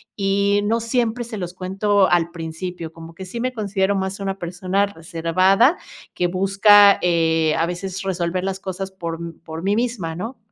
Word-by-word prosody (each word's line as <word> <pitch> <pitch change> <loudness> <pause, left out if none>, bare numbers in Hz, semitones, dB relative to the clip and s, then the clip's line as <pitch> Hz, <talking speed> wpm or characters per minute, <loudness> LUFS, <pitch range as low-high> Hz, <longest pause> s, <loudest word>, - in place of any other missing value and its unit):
y 200 0 +1
no 230 +2 +1
siempre 235 0 -1
se 225 -2 -7
los 180 -2 -5
cuento 195 +2 +1
al 170 -1 +2
principio, 165 0 -6
como 165 0 -12
que 190 - -8
sí 210 +6 -6
me 255 +1 -1
considero 200 -3 0
más 190 +1 -3
una 195 0 -3
persona 185 +3 -1
reservada 185 - +2 0.4
que 180 - 0
busca, 200 +2 +5
eh, 165 -2 +2
a 165 - +2
veces, 185 +2 -5
resolver 185 -1 -2
las 195 0 -3
cosas 190 0 -5
por 170 -3 -5 0.2
por 160 0 -7
mí 200 +2 +1
misma, 220 -9 -2
¿no? 225 +8 -6
190 Hz, 170 wpm, -21 LUFS, 170-200 Hz, 0.4 s, busca